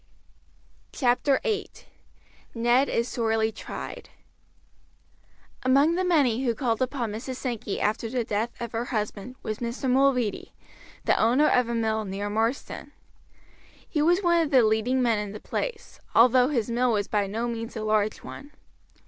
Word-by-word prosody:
CHAPTER 265 +1 +2
VIII: 430 -3 -1 0.9
NED 240 +4 +3
IS 235 +1 0
SORELY 225 -2 0
TRIED - - -8 1.5
Among 275 +5 +4
the 365 +2 0
many 275 -9 +2
who 235 -3 +1
called 230 -2 -1
upon 255 -4 -1
Mrs. 235 +5 -5
Sankey 240 -6 -4
after 220 +2 -1
the 245 0 -1
death 220 +2 -3
of 235 -2 -5
her 230 +1 -2
husband 215 +1 -4
was 215 0 -4
Mr. 240 +3 -3
Mulready, 255 -4 +1 0.5
the - - +3
owner 250 +7 +4
of 250 -2 +2
a 235 - -1
mill 220 -1 0
near 200 +1 -4
Marsden. 225 +5 -2 0.9
He 300 - -1
was 350 +5 +3
one 340 -1 +4
of 320 - 0
the 260 -4 +5
leading 220 +4 +2
men 230 -3 +2
in 205 -1 -5
the 210 - -7
place, 480 - -5 0.2
although 250 +2 +6
his 240 -6 -1
mill 245 0 +2
was 205 -2 0
by 205 -2 0
no 225 +4 -2
means 230 0 -5
a 215 - -4
large 215 -1 0
one. 290 +1 -10
235 Hz, 155 wpm, -26 LUFS, 220-260 Hz, 1.5 s, although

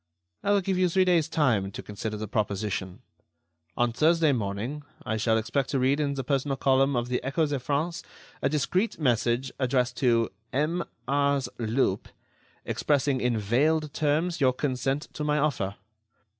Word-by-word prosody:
I - - -2
will 205 -1 +4
give 190 0 -1
you 180 -1 +3
three 185 +2 +3
days' 170 -4 +3
time 125 - +2
to - - -7
consider 105 +1 -5
the 110 0 -5
proposition. 100 -4 -2 0.7
On 120 0 +2
Thursday 160 +3 +3
morning 115 +5 -2 0.2
I 110 - -1
shall 110 +1 +2
expect 130 +5 -1
to 135 - 0
read 135 +3 +2
in 140 -2 0
the 135 - -3
personal 135 +1 0
column 135 +1 +3
of 120 0 0
the 125 0 -1
Echo 145 +5 +1
de 145 -2 -2
France 150 +6 -1 0.4
a 135 - +2
discreet 180 - 0
message 120 -1 +1
addressed 125 -1 +1
to 115 -4 +2 0.2
M. 160 +5 0 0.2
Ars. 140 -1 +1
Lup, 110 -3 0 0.6
expressing 140 -2 +1
in 125 -2 +1
veiled 145 +8 +1
terms 155 +3 0
your 130 -2 +4
consent 135 +1 -1
to 150 - -4
my 150 0 +1
offer. 125 -10 0
135 Hz, 165 wpm, -27 LUFS, 120-150 Hz, 0.7 s, will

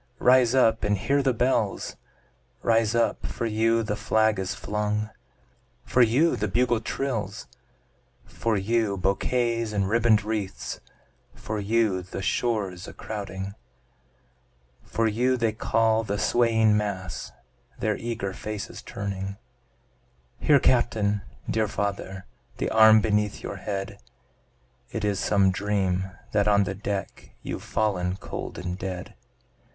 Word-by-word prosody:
rise 125 0 +5
up 115 -3 +4
and 105 -1 +2
hear 140 +9 +1
the 135 -1 +2
bells; 120 -4 0 0.7
Rise 115 -1 +3
up 115 - +1
for - - -4
you 115 +1 +2
the 105 -1 -2
flag 110 -1 +2
is 95 -1 -2
flung 105 +1 -2 0.7
for 125 - +3
you 125 +9 +4
the 105 - -1
bugle 120 +3 +2
trills, 115 -5 -3 0.8
For 115 -2 -1
you 105 0 +1
bouquets 115 +4 0
and 100 -2 +1
ribbon'd 110 -1 +3
wreaths 105 -3 -3 0.6
for 110 0 -4
you 105 -2 +1
the 90 +2 -7
shores 100 -6 -1
a - - -9
crowding, 100 -2 -6 1.3
For 115 - -1
you 125 +4 +2
they 115 -2 +1
call, 110 0 +2
the 100 -1 -2
swaying 110 -2 +3
mass, 100 -4 -3 0.5
their 110 -1 0
eager 115 -4 -4
faces 105 0 -6
turning; 100 -1 -5 1.0
Here 145 -2 +5
Captain! 105 -6 +2 0.3
dear 110 -1 +1
father! 100 -2 -3 0.3
The - - -2
arm 110 -1 +7
beneath 105 -1 0
your - - -5
head! 100 0 -4 0.9
It 110 -2 -2
is 100 -2 0
some 100 -2 +3
dream 95 -2 0 0.2
that 105 0 +2
on 100 -1 +5
the 100 - -3
deck, 100 0 -5
You've - - -4
fallen 90 -4 0
cold - - -6
and 90 +1 -4
dead. 90 -1 -5
105 Hz, 130 wpm, -26 LUFS, 100-115 Hz, 1.3 s, arm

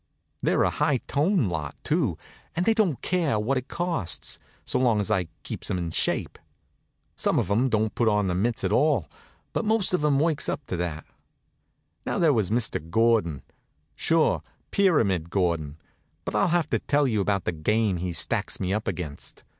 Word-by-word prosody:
They're - - +2
a - - +2
high 150 -2 +1
toned 150 - +1
lot, 75 -4 -4
too, 145 - +1 0.4
and 175 +2 0
they 225 - +4
don't 200 - +1
care 170 -10 +1
what 125 +5 +1
it 130 - -11
costs, 170 - -2 0.3
so - - 0
long 120 -4 +3
as 100 - -1
I 90 -3 +1 0.2
keeps - - -6
'em 95 - 0
in 85 -2 -3
shape. - - -1 0.8
Some - - +1
of 95 - 0
'em 120 +6 +3
don't 110 -1 +1
put 120 - +1
on 105 -1 +3
the 90 - 0
mitts 110 +6 0
at 95 - 0
all, 130 - +2 0.5
but - - 0
most 215 -3 +2
of 180 - +1
'em 145 -2 +3
works 155 -1 +1
up 145 - -3
to 90 - -3
that. 85 -3 -3 1.0
Now - - -2
there 160 -4 +4
was 110 -7 +1
Mr. 115 +1 0
Gordon. 110 - +2 0.5
Sure, - - +2 0.3
Pyramid 110 - +2
Gordon. 85 -6 -1 0.5
But - - -3
I'll - - +3
have 175 -1 +1
to - - +2
tell 145 0 +2
you 110 -6 +1
about 100 -1 0
the - - 0
game 100 +5 +1
he 90 +1 -3
stacks - - -1
me 95 0 -1
up 110 +1 -2
against. 75 -5 -5
110 Hz, 185 wpm, -26 LUFS, 90-150 Hz, 1.0 s, they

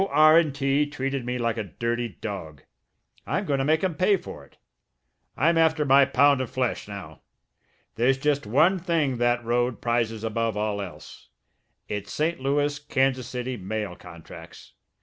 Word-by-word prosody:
R.& 155 +3 +6
T. 140 +1 0
treated 135 -3 -3
me 125 0 -1
like 115 -1 -1
a 110 - -1
dirty 115 +5 -3
dog. 80 -9 -6 0.6
I'm - - -1
going 140 -2 0
to - - +1
make 155 +4 +2
'em 185 -2 +1
pay 185 +4 +3
for 75 - -10
it; 70 - -22 0.8
I'm 165 +3 +3
after 160 -2 +3
my 135 0 +6
pound 140 +1 +3
of 130 - -4
flesh 130 -5 -2
now! 95 -8 -9 0.8
There's 130 +3 +3
just 145 -3 0
one 160 - +3
thing 160 -7 0
that 120 0 +1
road 120 +1 0
prizes 115 -2 -1
above 115 -1 -1
all 105 -1 -1
else 95 -3 -10 0.6
it's 105 -1 -5
St. 165 +3 -1
Louis 145 +2 0
Kansas 135 -3 0
City 125 0 -4
mail 100 -1 -4
contracts. 85 -3 -13
130 Hz, 160 wpm, -25 LUFS, 115-145 Hz, 0.8 s, R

